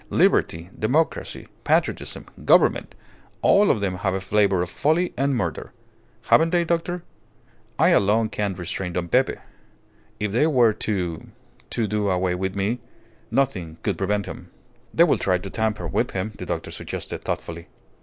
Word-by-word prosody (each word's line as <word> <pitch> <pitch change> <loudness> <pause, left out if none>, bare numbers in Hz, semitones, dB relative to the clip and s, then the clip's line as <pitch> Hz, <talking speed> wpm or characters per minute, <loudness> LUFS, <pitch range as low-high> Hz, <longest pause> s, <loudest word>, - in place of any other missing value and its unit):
Liberty, 85 +3 +2
democracy, 145 +9 0 0.2
patriotism, - - 0 0.2
government - - +3 0.5
all 200 0 +5
of 105 - +2
them 95 -2 -1
have 95 0 -1
a - - -1
flavour 95 -1 +2
of 90 - -6
folly 165 +4 +1
and 140 +1 +1
murder. 80 - -3 0.5
Haven't 165 +1 +5
they, 175 0 +2
doctor?... 170 +1 -1 0.7
I - - +5
alone 110 +3 +3
can 100 -3 -2
restrain 90 0 -4
Don 85 0 -2
Pepe. - - +3 0.8
If 105 -1 -1
they 125 +9 +3
were 125 -7 +4
to 90 -7 -3 0.4
to 115 -2 -1
do 105 -1 0
away 90 -1 +1
with 95 +1 -2
me, 100 +5 -1 0.5
nothing 90 -13 -1
could 100 -5 -1
prevent 100 +1 0
him." 90 - -9 0.4
"They 170 - +5
will 170 - +3
try 95 -1 +2
to 95 +2 -8
tamper 110 -5 -1
with - - 0
him," 95 +3 -2
the - - -8
doctor - - -3
suggested, - - -5
thoughtfully. 85 0 -4
100 Hz, 155 wpm, -24 LUFS, 90-125 Hz, 0.8 s, all